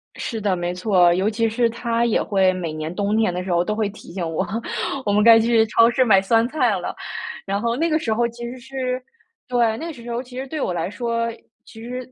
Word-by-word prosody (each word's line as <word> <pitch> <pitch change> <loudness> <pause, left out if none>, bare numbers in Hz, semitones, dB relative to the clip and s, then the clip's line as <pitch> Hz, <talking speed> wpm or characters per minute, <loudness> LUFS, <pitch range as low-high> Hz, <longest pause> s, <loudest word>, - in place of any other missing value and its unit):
是 225 -3 -4
的， 195 -3 +1
没 175 0 -2
错， 180 -2 +3
尤 190 +4 +1
其 225 0 0
是 230 +1 +1
他 235 0 -1
也 230 - +2
会 190 -2 +2
每 170 -4 -4
年 155 +2 -5
冬 205 +2 0
天 220 -5 +2
的 180 0 -3
时 190 - -4
候 175 0 +3
都 215 +4 -2
会 215 -1 0
提 205 -4 -13
醒 170 -3 -3
我， 160 - -1 0.6
我 205 - +1
们 210 +1 +4
该 230 -1 +8
去 225 0 +3
超 230 +2 +5
市 255 +2 +3
买 195 -6 +5
酸 225 +3 +3
菜 250 -9 +1
了， 180 - -4 0.5
然 200 +1 -2
后 235 0 0
那 330 +4 +1
个 310 - +2
时 225 -8 -1
候 235 +2 +1
其 235 +1 -10
实 245 +2 -6
是， 255 0 -3 0.5
对， 235 -3 +1
那 325 - -6
个 330 - -5
时 240 -2 -9
候 235 +1 -2
其 250 0 -11
实 265 - -3
对 305 +3 -5
我 180 - -1
来 170 +1 -2
说， 230 +2 -2 0.3
其 225 -1 -13
实， 250 +1 -7
225 Hz, 270 characters per minute, -22 LUFS, 195-240 Hz, 0.6 s, 该